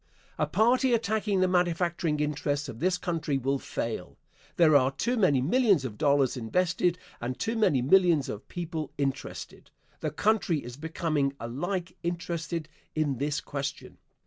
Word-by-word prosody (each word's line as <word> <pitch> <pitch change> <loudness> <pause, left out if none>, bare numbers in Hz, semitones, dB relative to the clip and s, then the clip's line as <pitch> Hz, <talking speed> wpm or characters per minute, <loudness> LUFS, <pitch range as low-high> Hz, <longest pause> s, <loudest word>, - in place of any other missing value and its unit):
A - - +2
party 245 +3 +3
attacking 215 -3 0
the 185 - +4
manufacturing 175 -3 +1
interests 145 -1 -1
of 115 -4 -8
this 180 +3 +2
country 165 -5 -1
will 135 +1 0
fail. 115 -8 -4 0.4
There 160 -3 +5
are 130 -2 +5
too 235 - -1
many 150 - +3
millions 200 - +3
of 110 -5 -6
dollars 140 -3 +3
invested 175 +8 +1 0.2
and 125 +1 -3
too 225 - -1
many 150 - +3
millions 170 -1 +4
of 105 - -6
people 160 -4 -4
interested. 135 -2 -4 0.3
The 155 - -1
country 180 -1 +1
is 120 0 -8
becoming 155 -2 -1
alike 170 +9 -3
interested 170 -2 -3 0.3
in 145 -5 0
this 145 +2 0
question. 140 -1 -5
160 Hz, 145 wpm, -28 LUFS, 140-180 Hz, 0.4 s, There